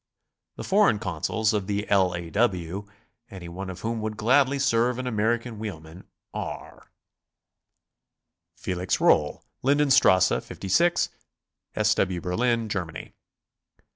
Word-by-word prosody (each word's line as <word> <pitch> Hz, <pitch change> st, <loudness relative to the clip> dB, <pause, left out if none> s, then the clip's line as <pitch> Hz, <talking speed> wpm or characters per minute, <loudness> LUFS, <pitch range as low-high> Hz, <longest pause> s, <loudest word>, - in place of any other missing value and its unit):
The -, -, -7 dB
foreign 200 Hz, -, +3 dB
Consuls 105 Hz, +5 st, -1 dB
of 100 Hz, -3 st, -2 dB
the 105 Hz, 0 st, -2 dB
L. 95 Hz, -3 st, +3 dB
A. 85 Hz, -1 st, -6 dB
W., 100 Hz, -3 st, -1 dB, 0.4 s
any 95 Hz, -3 st, -9 dB
one 95 Hz, +3 st, -6 dB
of 95 Hz, 0 st, -8 dB
whom 115 Hz, 0 st, -3 dB
would 110 Hz, 0 st, -4 dB
gladly 135 Hz, +5 st, +3 dB
serve 120 Hz, -2 st, +1 dB
an 130 Hz, -, -4 dB
American 115 Hz, 0 st, -1 dB
wheelman, 90 Hz, -5 st, -8 dB, 0.3 s
are: -, -, -7 dB, 1.7 s
Felix 90 Hz, +1 st, -2 dB
Rohl, 75 Hz, -1 st, +2 dB, 0.2 s
Linden 145 Hz, +1 st, +2 dB
Strasse 95 Hz, -6 st, +5 dB
5G, 170 Hz, -, 0 dB, 0.7 s
S. -, -, +3 dB
W. 90 Hz, -2 st, 0 dB
Berlin, 115 Hz, +6 st, 0 dB
Germany. 90 Hz, -6 st, -5 dB
105 Hz, 120 wpm, -25 LUFS, 90-120 Hz, 1.7 s, Strasse